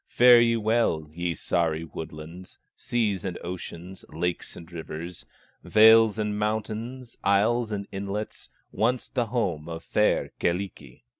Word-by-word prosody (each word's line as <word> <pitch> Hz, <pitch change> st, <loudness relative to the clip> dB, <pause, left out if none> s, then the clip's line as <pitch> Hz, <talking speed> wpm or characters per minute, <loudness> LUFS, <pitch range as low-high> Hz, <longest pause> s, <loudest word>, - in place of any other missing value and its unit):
Fare 120 Hz, -1 st, +7 dB
ye 115 Hz, 0 st, +3 dB
well, 110 Hz, -8 st, +1 dB
ye 85 Hz, 0 st, -2 dB
Sahri 80 Hz, -2 st, 0 dB
woodlands, 80 Hz, +3 st, -9 dB, 0.2 s
Seas 105 Hz, -6 st, -1 dB
and 90 Hz, -2 st, -4 dB
oceans, 90 Hz, +1 st, -7 dB
lakes 90 Hz, 0 st, -3 dB
and 85 Hz, 0 st, -12 dB
rivers, 85 Hz, +1 st, -7 dB, 0.4 s
Vales 110 Hz, 0 st, +6 dB
and 105 Hz, -1 st, -2 dB
mountains, 110 Hz, +4 st, -3 dB
isles 110 Hz, +4 st, +2 dB
and 100 Hz, -1 st, -3 dB
inlets, 100 Hz, +2 st, -5 dB, 0.2 s
Once 120 Hz, +3 st, 0 dB
the 120 Hz, -3 st, -1 dB
home 90 Hz, -10 st, -2 dB
of 80 Hz, -1 st, -6 dB
fair -, -, +1 dB
Kyllikki!" 85 Hz, -8 st, -3 dB
100 Hz, 130 wpm, -26 LUFS, 85-110 Hz, 0.4 s, Fare